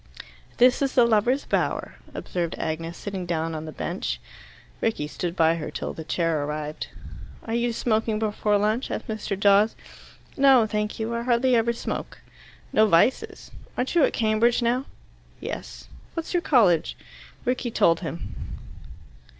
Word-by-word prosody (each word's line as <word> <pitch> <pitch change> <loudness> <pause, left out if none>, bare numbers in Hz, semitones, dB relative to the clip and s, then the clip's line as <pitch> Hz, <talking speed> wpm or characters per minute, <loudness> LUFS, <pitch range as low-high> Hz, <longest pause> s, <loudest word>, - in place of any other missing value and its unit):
"This 250 +2 +5
is 275 -2 0
the 245 - +6
lovers' 235 +4 +2
bower," - - -1 0.2
observed 170 -2 -3
Agnes, 165 +1 -3
sitting 190 -3 -5
down 165 -1 -1
on 155 0 -5
the 155 - -6
bench. 175 +4 -3 0.6
Rickie 220 -10 0
stood 170 +3 -4
by 165 -1 +3
her 155 - -5
till - - -4
the 160 - -7
chair 165 -2 0
arrived. 150 +1 -4 0.6
"Are 225 - -4
you 235 +1 +1
smoking 220 -1 0
before 210 -1 +1
lunch?" 215 +5 0
asked - - -4
Mr. 215 -3 -3
Dawes. 205 +2 +4 0.6
"No, 270 -4 +6
thank 210 0 -2
you. 225 +1 -2
I 235 - -1
hardly 245 +1 +3
ever 235 0 +3
smoke." 235 - -5 0.6
"No 215 0 +5
vices. 185 +7 +2 0.3
Aren't 250 - -1
you 340 -4 +4
at - - +4
Cambridge 230 +2 +2
now?" 245 +3 +1 0.5
"Yes." - - -7 0.3
"What's 330 +1 -4
your 350 - +2
college?" 200 - +3 0.5
Rickie 250 0 0
told 165 -7 +3
him. 165 -1 -6
215 Hz, 150 wpm, -25 LUFS, 170-240 Hz, 0.6 s, the